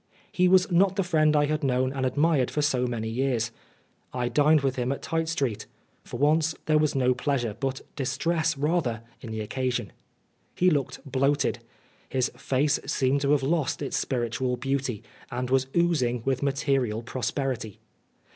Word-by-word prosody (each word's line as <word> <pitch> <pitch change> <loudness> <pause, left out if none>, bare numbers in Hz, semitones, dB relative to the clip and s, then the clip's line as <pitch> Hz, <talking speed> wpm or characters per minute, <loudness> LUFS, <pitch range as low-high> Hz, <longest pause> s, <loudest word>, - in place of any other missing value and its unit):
He 180 0 +3
was 185 +1 +4
not 190 +2 +4
the 195 - +1
friend 155 -3 +3
I 145 0 +4
had 150 0 -1
known 130 0 +1
and 135 -1 0
admired 145 -1 +2
for 150 - -1
so 130 -4 +1
many 115 -2 -3
years. 120 -1 0 0.6
I 125 -1 -1
dined 150 +4 +4
with 135 -1 0
him 125 0 -1
at 140 - -4
Tite 165 0 -1
Street: 130 -10 -2 0.4
for - - -7
once 155 +2 +3
there 155 -1 +3
was 150 -2 +1
no 125 -1 +3
pleasure, 125 -4 -1
but 135 -1 -2
distress 155 +4 0
rather, 140 -7 0 0.2
in 120 - -8
the 110 0 -4
occasion. 125 +3 -2 0.6
He 180 0 +3
looked 145 -3 -1
bloated. 140 +2 +1 0.5
His 130 -1 0
face 140 +2 +1
seemed 140 -1 +1
to 140 0 +1
have 140 -2 +2
lost 150 0 0
its 135 - -3
spiritual 125 0 -1
beauty, 135 -4 -2 0.3
and 125 0 -3
was 130 0 +2
oozing 130 -9 +1
witfi 130 0 0
material 135 -5 0
prosperity. 125 -3 -3
135 Hz, 165 wpm, -26 LUFS, 125-150 Hz, 0.6 s, was